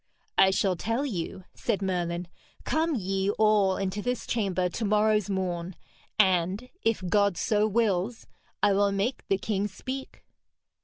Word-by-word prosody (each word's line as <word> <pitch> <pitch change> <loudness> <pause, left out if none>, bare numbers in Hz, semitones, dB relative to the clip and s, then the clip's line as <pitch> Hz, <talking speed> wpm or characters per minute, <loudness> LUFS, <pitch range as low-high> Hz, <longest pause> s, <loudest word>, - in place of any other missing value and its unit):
'I 190 - +7
shall 190 -1 +1
tell 230 - -1
you,' 190 -6 -4
said 200 - -2
Merlin. 175 -2 -1 0.4
'Come 320 0 +1
ye 195 -2 -1
all 210 -3 +4
into 195 +1 -2
this 245 +2 -2
chamber 190 -6 0
to 200 +6 -4
morrow's 210 -1 +2
morn, 180 -2 -2 0.4
and, 190 +3 +2
if 225 -4 0
God 200 -1 +2
so 210 0 +2
wills, 220 0 0 0.4
I 205 -1 +5
will 200 0 +3
make 200 +6 -1
the 195 - +2
king 200 0 -1
speak.' 260 +7 -7
200 Hz, 145 wpm, -27 LUFS, 185-220 Hz, 0.4 s, I